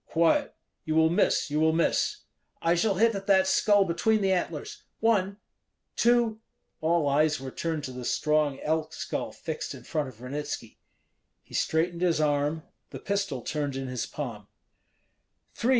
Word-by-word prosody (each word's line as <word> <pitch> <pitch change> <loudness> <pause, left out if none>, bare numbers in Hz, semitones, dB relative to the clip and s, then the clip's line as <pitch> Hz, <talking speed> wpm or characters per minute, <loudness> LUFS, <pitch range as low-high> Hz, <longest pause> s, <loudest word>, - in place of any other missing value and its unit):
"Quiet! 170 - +2 0.3
you 155 - -2
will 160 0 +4
miss, 170 - +2
you 150 - +1
will 160 0 +3
miss." 165 +1 +1 0.4
"I 165 - +2
shall 195 +3 +2
hit 225 +4 +4
at 195 -1 -5
that 190 -1 +5
skull 205 +1 +4
between 205 +5 +1
the 195 -1 +2
antlers 170 -5 -2 0.2
one! 200 -3 +2 0.6
two!" 235 -2 +3 0.4
All 160 -1 +2
eyes 150 +1 +2
were 135 0 -6
turned 160 0 -3
to 130 - -5
the 125 0 -7
strong 150 +1 +1
elk 155 0 -1
skull - - -4
fixed - - -5
in - - -12
front 150 -4 -2
of 115 -4 -16
Ranitski. 140 +4 -6 0.6
He - - -19
straightened 170 +2 0
his 175 -3 +2
arm; 150 +1 +1 0.3
the - - -7
pistol 200 - -2
turned 145 -3 -2
in 135 -1 -4
his 125 -1 -3
palm. 115 -9 -6 1.1
"Three!" 235 - -1
160 Hz, 165 wpm, -27 LUFS, 145-195 Hz, 1.1 s, that